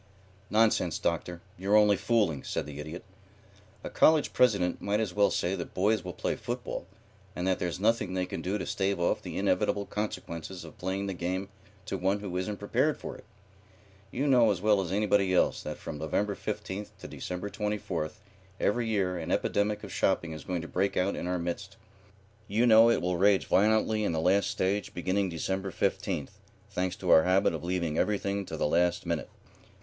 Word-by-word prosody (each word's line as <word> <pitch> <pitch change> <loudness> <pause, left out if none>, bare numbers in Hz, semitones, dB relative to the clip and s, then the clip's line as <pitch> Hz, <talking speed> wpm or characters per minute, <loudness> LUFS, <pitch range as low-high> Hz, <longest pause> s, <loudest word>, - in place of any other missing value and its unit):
"Nonsense, 105 -6 +3
Doctor. 85 +1 -2 0.2
You're 100 +3 +2
only 105 -1 +5
fooling," 100 - +1
said - - -3
the 75 -1 -8
Idiot. 80 +4 -7 0.8
"A - - -4
college 155 -1 +4
president 100 -8 +2
might 100 +1 0
as 105 -5 -1
well 100 +1 +4
say 90 - 0
that 90 -3 -5
boys 105 +1 +2
will 90 - -5
play - - -2
football, - - -5 0.5
and 90 - -3
that 95 -1 +1
there's 90 0 -2
nothing 105 -3 +1
they 90 0 0
can - - -5
do 95 +3 -1
to - - -4
stave 100 -1 -1
off 85 - +1
the - - -6
inevitable 100 0 +1
consequences 95 -4 -5
of - - -13
playing 95 +2 -2
the 100 - -3
game 95 +2 -3 0.4
to 95 -2 -3
one 95 +3 +1
who 100 -3 -6
isn't 95 +3 -2
prepared - - +1
for - - -7
it. - - -14 0.8
You 135 - -2
know 125 -5 +5
as 100 - 0
well 105 0 +3
as 90 -2 -4
anybody 100 -2 +2
else - - +2
that - - -5
from 75 - -7
November 100 +7 0
15th 100 +1 -5
to - - -9
December 90 +3 -5
24th 105 -5 -3 0.4
every 115 +2 +1
year 95 -5 0
an 80 0 -5
epidemic 105 +1 0
of 100 -3 -7
shopping 85 -3 +1
is 80 -1 -7
going 90 -2 -3
to - - -6
break 95 +3 0
out 95 +2 +1
in - - -4
our 90 0 0
midst. 85 0 -5 0.7
You 110 +5 +2
know 115 -1 +7
that 115 - +4
it - - -2
will 90 0 0
rage 100 +1 +4
violently 110 +1 +3
in 100 - 0
the 80 - 0
last 95 +5 +3
stage 95 +1 -1
beginning 95 +2 0
December 95 +3 -2
15th, - - -2 0.3
thanks 90 0 -1
to - - -1
our 80 - +8
habit 95 +2 +3
of 80 - -5
leaving 85 -3 -1
everything 100 -2 0
to 80 - -5
the - - 0
last 85 +3 +1
minute. 85 -2 -2
95 Hz, 195 wpm, -29 LUFS, 90-105 Hz, 0.8 s, our